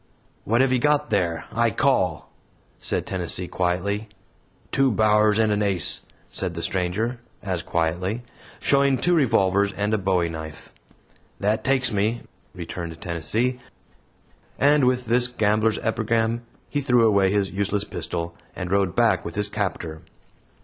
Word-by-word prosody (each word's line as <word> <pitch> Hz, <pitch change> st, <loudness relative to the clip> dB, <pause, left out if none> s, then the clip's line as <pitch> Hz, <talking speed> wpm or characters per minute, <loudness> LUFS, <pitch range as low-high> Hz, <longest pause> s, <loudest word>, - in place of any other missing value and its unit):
"What 115 Hz, +4 st, +3 dB
have 135 Hz, -1 st, +3 dB
you 130 Hz, -, +2 dB
got 150 Hz, +1 st, +1 dB
there? 85 Hz, -6 st, 0 dB
I 115 Hz, +1 st, +2 dB
call," 105 Hz, -, +1 dB, 0.5 s
said -, -, -1 dB
Tennessee, 90 Hz, -1 st, -1 dB
quietly. 95 Hz, +5 st, -1 dB, 0.6 s
"Two 135 Hz, -1 st, +3 dB
bowers 105 Hz, 0 st, +3 dB
and 110 Hz, -1 st, +3 dB
an 105 Hz, 0 st, +1 dB
ace," 95 Hz, -5 st, +1 dB, 0.3 s
said 90 Hz, -3 st, -4 dB
the 85 Hz, -, -4 dB
stranger, 100 Hz, +7 st, -1 dB, 0.2 s
as 95 Hz, -4 st, -2 dB
quietly, 90 Hz, +9 st, -1 dB, 0.4 s
showing 140 Hz, -1 st, +3 dB
two 175 Hz, +8 st, +1 dB
revolvers 100 Hz, -, +3 dB
and 105 Hz, +3 st, -1 dB
a 110 Hz, -, +2 dB
bowie 95 Hz, -3 st, +1 dB
knife. 80 Hz, -1 st, -8 dB, 0.7 s
"That 110 Hz, +2 st, 0 dB
takes 130 Hz, -3 st, +2 dB
me," 110 Hz, +4 st, 0 dB, 0.3 s
returned 85 Hz, -1 st, -6 dB
Tennessee; 105 Hz, -, -1 dB, 1.0 s
and 145 Hz, 0 st, +4 dB
with 125 Hz, 0 st, +1 dB
this 120 Hz, +2 st, +3 dB
gamblers' 110 Hz, -2 st, +1 dB
epigram, 115 Hz, +1 st, 0 dB, 0.3 s
he 145 Hz, -, -2 dB
threw 125 Hz, -4 st, +4 dB
away 100 Hz, -3 st, +4 dB
his 100 Hz, -1 st, 0 dB
useless 100 Hz, +1 st, -1 dB
pistol, 85 Hz, -4 st, -4 dB, 0.2 s
and 90 Hz, 0 st, -5 dB
rode 100 Hz, -2 st, +1 dB
back 120 Hz, -1 st, +3 dB
with -, -, -7 dB
his 105 Hz, 0 st, -1 dB
captor. 90 Hz, -6 st, -3 dB
105 Hz, 140 wpm, -24 LUFS, 90-120 Hz, 1.0 s, and